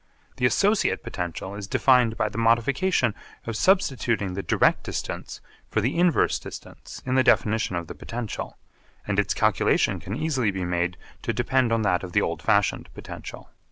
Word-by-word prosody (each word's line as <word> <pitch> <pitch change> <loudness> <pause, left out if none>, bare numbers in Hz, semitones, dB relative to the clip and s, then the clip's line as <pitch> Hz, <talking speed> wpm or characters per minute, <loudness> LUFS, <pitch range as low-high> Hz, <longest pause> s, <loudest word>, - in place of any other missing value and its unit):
The 125 - +3
associate 205 - +2
potential 90 +2 -5
is 100 -1 -6
defined 125 -1 +3
by 110 - +1
the 105 +2 -5
modification 115 - +2 0.3
of 115 - -4
substituting 120 - +1
the 100 - -3
direct - - +2
distance - - -5 0.3
for - - 0
the 120 +6 0
inverse 175 -1 +3
distance - - -10
in 130 - -1
the 130 0 +4
definition 110 -6 +2
of 85 -1 -3
the - - -8
potential, 115 -2 -6 0.5
and 100 -1 0
its 100 -1 +1
calculation 110 -2 +2
can 100 - -5
easily 135 -7 0
be 95 -2 -3
made 90 0 -1 0.2
to 115 - -2
depend 120 +1 +1
on 115 -1 +1
that 90 -3 +2
of 90 -2 -8
the - - +4
old - - -2
fashioned - - +1
potential. - - -9
115 Hz, 170 wpm, -25 LUFS, 100-130 Hz, 0.5 s, the